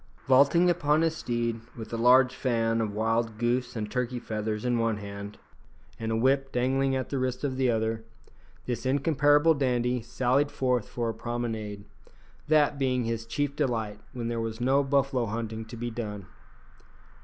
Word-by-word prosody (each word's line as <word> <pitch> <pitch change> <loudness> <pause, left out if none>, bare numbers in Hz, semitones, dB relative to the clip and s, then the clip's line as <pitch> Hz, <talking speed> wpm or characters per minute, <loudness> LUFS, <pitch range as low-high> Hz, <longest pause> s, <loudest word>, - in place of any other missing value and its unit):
Vaulting 140 +7 +5
upon 160 -3 +2
his 165 -1 +1
steed, 120 -4 -2 0.2
with 115 0 -8
a - - 0
large 125 +2 +5
fan 115 -3 0
of 110 -2 -1
wild 115 0 0
goose 120 +3 0
and 105 -2 -4
turkey 125 0 -1
feathers 110 -1 -3
in 120 -1 +1
one 115 -2 +1
hand, 100 0 -8 0.6
and 115 0 -2
a - - +1
whip 135 +3 +2
dangling 135 +2 +1
at 130 -2 -2
the 140 - -1
wrist 130 +1 -2
of 135 -2 -1
the 130 -1 +1
other, 110 0 0 0.6
this 120 -2 -3
incomparable 145 +3 +3
dandy 125 -3 0
sallied 130 +5 +1
forth 125 -5 0
for 120 -1 -2
a - - -2
promenade 110 -3 -4 0.6
that 150 -2 +3
being 130 -2 +1
his 115 0 -3
chief 145 +4 -2
delight 115 -8 -1
when 120 -2 -4
there 115 -1 -2
was 115 0 -4
no 135 +3 +3
buffalo 135 -3 +1
hunting 110 +1 -4
to 110 +2 -9
be 120 +1 -4
done. 105 -4 -5
120 Hz, 170 wpm, -28 LUFS, 115-135 Hz, 0.6 s, Vaulting